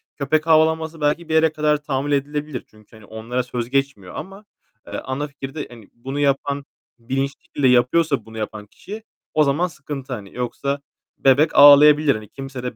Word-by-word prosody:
köpek 155 Hz, +3 st, 0 dB
havlaması 160 Hz, 0 st, +2 dB
belki 150 Hz, +3 st, 0 dB
bir -, -, -1 dB
yere 160 Hz, 0 st, +4 dB
kadar 150 Hz, -1 st, +1 dB
tahammül 140 Hz, 0 st, -2 dB
edilebilir. 145 Hz, -1 st, -2 dB
Çünkü 110 Hz, +1 st, -21 dB
hani 110 Hz, -1 st, -15 dB
onlara 115 Hz, +4 st, -4 dB
söz 120 Hz, -1 st, -5 dB
geçmiyor 135 Hz, -9 st, -2 dB
ama, 195 Hz, +2 st, -9 dB, 0.4 s
eee, -, -, -10 dB
ana 135 Hz, +3 st, -4 dB
fikirde 140 Hz, +1 st, -7 dB
hani 115 Hz, -4 st, -14 dB
bunu 135 Hz, +4 st, -6 dB
yapan 140 Hz, 0 st, 0 dB, 0.3 s
bilinçli 135 Hz, +4 st, -3 dB
şekilde 140 Hz, -2 st, 0 dB
yapıyorsa 125 Hz, +1 st, +2 dB
bunu 110 Hz, 0 st, -11 dB
yapan 110 Hz, -1 st, -5 dB
kişi 210 Hz, -, -10 dB, 0.3 s
o 155 Hz, -, +4 dB
zaman 150 Hz, +5 st, +1 dB
sıkıntı, 140 Hz, -4 st, -7 dB
hani. 100 Hz, -5 st, -8 dB
Yoksa 140 Hz, +3 st, -3 dB, 0.4 s
bebek 135 Hz, +4 st, +3 dB
ağlayabilir. 145 Hz, +1 st, +8 dB
Hani 110 Hz, -1 st, -9 dB
kimse 135 Hz, -2 st, -8 dB
de 125 Hz, -2 st, -4 dB
140 Hz, 170 wpm, -21 LUFS, 125-150 Hz, 0.4 s, ağlayabilir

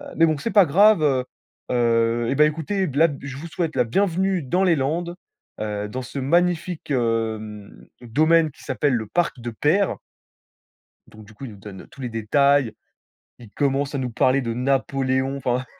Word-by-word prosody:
mais 165 Hz, -, +5 dB
bon, 155 Hz, -2 st, 0 dB
c'est 230 Hz, -, -4 dB
pas 200 Hz, -4 st, +6 dB
grave, 200 Hz, +4 st, +5 dB
heu 130 Hz, -3 st, +1 dB, 0.5 s
heu, 115 Hz, -1 st, +1 dB
eh -, -, +1 dB
bah, 150 Hz, +2 st, +5 dB
écoutez, 165 Hz, +5 st, -1 dB
b 140 Hz, -, -7 dB
là, 165 Hz, +2 st, +6 dB
je 135 Hz, -1 st, -7 dB
vous 165 Hz, -, -7 dB
souhaite 165 Hz, -1 st, -3 dB
la 125 Hz, -, +3 dB
bienvenue 190 Hz, -, 0 dB
dans 180 Hz, +9 st, 0 dB
les 175 Hz, -3 st, +3 dB
Landes, 165 Hz, +5 st, -2 dB, 0.5 s
heu, 105 Hz, -1 st, -3 dB
dans 130 Hz, +4 st, -5 dB
ce 135 Hz, +3 st, -6 dB
magnifique, 175 Hz, +2 st, 0 dB
hem, 110 Hz, -4 st, -3 dB
domaine 155 Hz, +6 st, +2 dB
qui -, -, -18 dB
s'appelle 140 Hz, -4 st, 0 dB
le 110 Hz, -2 st, -3 dB
parc 170 Hz, +1 st, -1 dB
de 120 Hz, 0 st, -5 dB
Peyre». 165 Hz, -, +1 dB, 1.1 s
Donc 110 Hz, 0 st, -14 dB
du 110 Hz, +1 st, -17 dB
coup, 135 Hz, -, -10 dB
il 125 Hz, -, -7 dB
nous -, -, -13 dB
donne 95 Hz, -1 st, -11 dB
tous 140 Hz, -, -16 dB
les 125 Hz, -, -3 dB
détails, 130 Hz, +3 st, +2 dB, 0.7 s
il 115 Hz, -4 st, -13 dB
commence 140 Hz, 0 st, -1 dB
à -, -, 0 dB
nous 130 Hz, -2 st, -2 dB
parler 130 Hz, +3 st, +2 dB
de 115 Hz, -2 st, -3 dB
Napoléon, 135 Hz, +1 st, 0 dB
enfin 125 Hz, -1 st, -1 dB
135 Hz, 185 wpm, -22 LUFS, 120-165 Hz, 1.1 s, pas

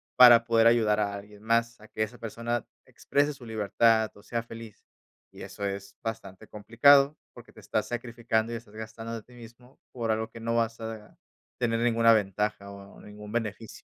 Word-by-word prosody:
para 120 Hz, -2 st, +8 dB
poder 115 Hz, -1 st, +4 dB
ayudar 110 Hz, -3 st, +3 dB
a 100 Hz, -1 st, 0 dB
alguien 105 Hz, +1 st, -11 dB
más, 115 Hz, 0 st, 0 dB
a 105 Hz, -, -14 dB
que 110 Hz, -, -2 dB
esa 115 Hz, +3 st, -7 dB
persona 115 Hz, +1 st, -3 dB, 0.2 s
exprese 145 Hz, +1 st, -1 dB
su 135 Hz, -3 st, -14 dB
libertad 110 Hz, +1 st, +2 dB
o 100 Hz, -, -16 dB
sea 115 Hz, -1 st, -3 dB
feliz. 115 Hz, -2 st, -12 dB, 0.5 s
Y -, -, -13 dB
eso 100 Hz, -, -6 dB
es 100 Hz, 0 st, -5 dB
bastante 110 Hz, -2 st, -7 dB
complicado, 140 Hz, +7 st, +4 dB, 0.2 s
porque -, -, -14 dB
te -, -, -16 dB
estás -, -, -2 dB
sacrificando, 115 Hz, -1 st, -2 dB
y -, -, -3 dB
estás 110 Hz, -2 st, -15 dB
gastando 110 Hz, +1 st, -7 dB
de 115 Hz, -, -8 dB
ti 125 Hz, -, -20 dB
mismo, 120 Hz, +2 st, -15 dB
por 115 Hz, -3 st, -2 dB
algo 110 Hz, +1 st, -2 dB
que 115 Hz, -, -12 dB
no 115 Hz, +1 st, -2 dB
vas 115 Hz, 0 st, 0 dB
a 110 Hz, -1 st, -8 dB, 0.4 s
tener 115 Hz, -2 st, 0 dB
ninguna 115 Hz, -1 st, +4 dB
ventaja 105 Hz, -1 st, -1 dB
o 100 Hz, 0 st, -13 dB
ningún 105 Hz, 0 st, -11 dB
beneficio. 115 Hz, -1 st, -5 dB
115 Hz, 185 wpm, -27 LUFS, 105-115 Hz, 0.5 s, para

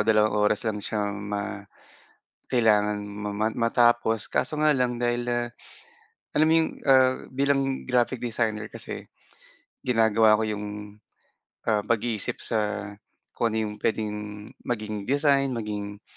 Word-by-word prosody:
2 110 Hz, -1 st, +3 dB, 0.2 s
oras 105 Hz, -, -1 dB
lang 110 Hz, -2 st, -1 dB
siyang 105 Hz, -1 st, -2 dB
ma 100 Hz, -1 st, -4 dB, 0.9 s
kailangan 105 Hz, -4 st, +3 dB
ma 105 Hz, 0 st, -5 dB
ma 110 Hz, +2 st, +1 dB
matapos. 115 Hz, -1 st, +2 dB
Kaso 155 Hz, -1 st, 0 dB
nga 155 Hz, -, +5 dB
lang 125 Hz, -4 st, +1 dB
dahil, 120 Hz, 0 st, 0 dB
ah, 120 Hz, 0 st, -1 dB, 0.8 s
alam 155 Hz, +1 st, +4 dB
mo -, -, +5 dB
'yong, 160 Hz, -, +2 dB, 0.2 s
ah, 130 Hz, -1 st, +6 dB, 0.2 s
bilang, 135 Hz, 0 st, 0 dB
graphic 125 Hz, 0 st, +1 dB
designer 110 Hz, -3 st, -1 dB
kasi -, -, -7 dB, 0.8 s
ginagawa 110 Hz, -2 st, +4 dB
ko 110 Hz, -, 0 dB
'yong, 105 Hz, -1 st, -3 dB, 1.1 s
ah, 105 Hz, -1 st, +1 dB
pag-iisip 115 Hz, -1 st, -1 dB
sa 110 Hz, -, 0 dB, 0.8 s
kung 115 Hz, -2 st, +1 dB
ano 110 Hz, -, +1 dB
'yong 105 Hz, -1 st, -3 dB
puwedeng 105 Hz, -1 st, -3 dB, 0.2 s
maging 105 Hz, -3 st, -3 dB
design, 140 Hz, -1 st, +3 dB
maging 105 Hz, -2 st, -5 dB
110 Hz, 130 wpm, -26 LUFS, 105-120 Hz, 1.1 s, ah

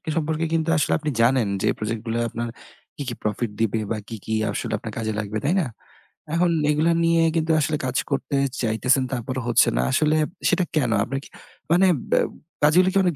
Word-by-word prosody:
সম্পর্কে 160 Hz, 0 st, 0 dB
কিন্তু 165 Hz, 0 st, +1 dB
আসলে -, -, +1 dB
আপনি 155 Hz, 0 st, -2 dB
জানেন 120 Hz, -2 st, +3 dB, 0.2 s
যে -, -, +2 dB
প্রজেক্টগুলো 115 Hz, +1 st, -3 dB
আপনার 120 Hz, +1 st, -4 dB, 0.5 s
কি, 145 Hz, -, -7 dB
কি 120 Hz, -, -2 dB
profit 105 Hz, +1 st, -1 dB
দিবে 110 Hz, 0 st, +1 dB
বা 110 Hz, -, 0 dB
কি, 115 Hz, -, -6 dB
কি 110 Hz, -, -3 dB, 0.2 s
আসলে -, -, -3 dB
আপনার -, -, -7 dB
কাজে 110 Hz, -1 st, -2 dB
লাগবে, 105 Hz, +1 st, -3 dB
তাই 165 Hz, -, +2 dB
না? -, -, -1 dB, 0.7 s
এখন 175 Hz, 0 st, +3 dB, 0.2 s
এগুলা 155 Hz, +3 st, +2 dB
নিয়ে 165 Hz, 0 st, +3 dB
কিন্তু 165 Hz, 0 st, +1 dB
আসলে 150 Hz, 0 st, 0 dB
কাজ 130 Hz, +1 st, -1 dB
করতে 140 Hz, +1 st, -1 dB, 0.3 s
চাইতেছেন 125 Hz, +4 st, +2 dB
তারপরও 130 Hz, +1 st, -3 dB
হচ্ছে 115 Hz, -, +5 dB
না। -, -, +3 dB
আসলে 155 Hz, 0 st, +2 dB, 0.3 s
সেটা 180 Hz, 0 st, +2 dB
কেন? 125 Hz, -7 st, +2 dB
আপনার 135 Hz, +3 st, -3 dB
কি -, -, -14 dB, 0.4 s
মানে 185 Hz, +2 st, +5 dB, 0.2 s
ব্যা -, -, +4 dB, 0.4 s
কাজগুলো 180 Hz, +5 st, +5 dB
কি -, -, +2 dB
অনেক 175 Hz, -4 st, +1 dB
135 Hz, 190 wpm, -23 LUFS, 115-160 Hz, 0.7 s, হচ্ছে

